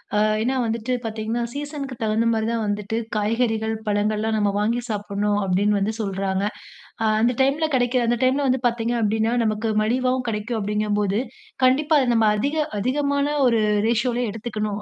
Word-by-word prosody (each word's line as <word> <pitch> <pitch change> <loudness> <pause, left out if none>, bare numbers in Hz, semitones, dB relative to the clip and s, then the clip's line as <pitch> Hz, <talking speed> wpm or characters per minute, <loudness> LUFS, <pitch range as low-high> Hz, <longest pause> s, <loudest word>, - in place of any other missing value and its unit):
அ - - +3 0.2
ஏன்னா, 260 +2 0
வந்துட்டு 230 +2 -2
பார்த்தீங்கன்னா 225 +2 -2
சீசனுக்கு 285 -2 -5
தகுந்த 220 +1 +1
மாதிரி 220 0 0
தான் 230 -1 -1
வந்துட்டு 205 +1 -2 0.2
காய்கறிகள், 220 +1 0
பழங்கள்லாம் 215 +1 0
நம்ம 205 -1 +1
வாங்கி 230 +4 0
சாப்புட்ணும் 205 -1 -1
அப்பிடின்னு 200 +2 +2
வந்து 210 +3 -1
சொல்றாங்க. 195 -1 -1 0.6
அ - - +1 0.2
அந்த 240 +2 +2
டைம்ல 295 +4 +1
கிடைக்கிற, 245 0 +1
அந்த 240 - +1
டைம்ல 275 +2 +2
வந்து 255 0 +1
பார்த்தீங்க 235 0 -2
அப்பிடின்னா, 220 +2 +1
நமக்கு 215 +1 -1
மலிவாவும் 255 +3 0
கிடைக்கும் 220 +2 -3
அப்பிடிங்கும்போது, 210 0 0 0.5
கண்டிப்பா 295 +5 +3
அது 245 -2 +2
நம்ம 225 -1 +4
அதிக, 285 +7 -1 0.2
அதிகமான 280 +4 0 0.3
ஒரு 230 -2 +2 0.3
ரேஷியோலே 240 +1 +1
எடுத்துக்கணும் 215 -2 -4
225 Hz, 155 wpm, -23 LUFS, 210-250 Hz, 0.6 s, நம்ம